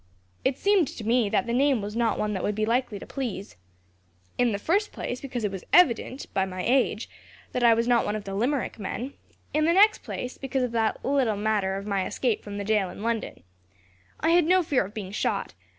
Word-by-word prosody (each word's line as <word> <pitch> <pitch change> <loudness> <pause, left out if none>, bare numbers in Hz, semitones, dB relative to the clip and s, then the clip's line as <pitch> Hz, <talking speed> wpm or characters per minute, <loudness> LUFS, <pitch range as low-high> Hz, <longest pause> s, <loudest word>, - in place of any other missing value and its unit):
It 265 - +1
seemed 395 -6 +3
to 230 - -8
me 230 -1 +2
that 245 - +1
the 235 - -2
name 270 0 +3
was 205 +1 -5
not 230 -1 +1
one 210 0 -1
that 190 - -2
would 210 - -1
be 215 0 0
likely 235 -1 0
to - - -9
please. 230 -8 -5 0.8
In 245 -1 +2
the 200 - -1
first 395 - 0
place, 245 - -5
because 250 -4 -4
it 205 - 0
was 190 -2 -6
evident, 265 -5 +3
by 190 - +2
my 185 -1 -4
age, 245 -4 +2 0.4
that 250 - -1
I 230 -1 +7
was 230 +1 0
not 240 -1 +4
one 210 - -2
of 215 - -4
the 195 - -6
Limerick 245 +4 -1
men; 240 +7 -4 0.4
in 305 +1 +2
the 335 - +4
next 415 +3 +5
place, 250 - -6
because 265 -1 -1
of 250 - -1
that 225 -2 -1
little 260 -6 +1
matter 205 -2 0
of 195 +1 -5
my 200 -2 -1
escape 240 -5 -1
from 205 -1 -7
the 200 - -3
jail 210 -3 +1
in 200 - -9
London. 230 -1 -3 0.8
I 325 - +2
had 345 -1 +5
no 365 +2 +4
fear 275 - +1
of 200 - -11
being 195 -3 -5
shot. 205 - -2
235 Hz, 230 wpm, -26 LUFS, 205-265 Hz, 0.8 s, I